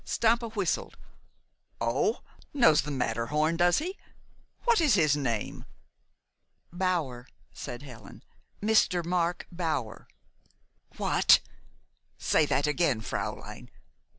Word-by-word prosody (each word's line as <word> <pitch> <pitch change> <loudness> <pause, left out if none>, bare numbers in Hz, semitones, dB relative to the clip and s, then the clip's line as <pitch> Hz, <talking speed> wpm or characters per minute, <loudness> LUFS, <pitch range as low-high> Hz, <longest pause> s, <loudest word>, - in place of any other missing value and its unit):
Stampa 230 +1 +1
whistled. 200 -6 -2 0.8
"Oh 125 - 0 0.3
knows 160 - +5
the 150 - -7
Matterhorn, 140 +5 0
does 175 +1 +3
he? 365 +6 -4 0.6
What 470 -5 +3
is 290 -9 +4
his 155 -6 +3
name?" 120 -7 -3 1.1
"Bower," 170 -10 -2 0.3
said 120 +3 -7
Helen, 115 -7 -12 0.4
"Mr. 205 -5 +3
Mark 175 0 -1
Bower." 155 -10 -3 0.9
"What! - - +5 0.8
Say 155 - +2
that 140 0 +1
again, 150 -6 +1
fräulein! - - -5
160 Hz, 95 wpm, -28 LUFS, 130-185 Hz, 1.1 s, knows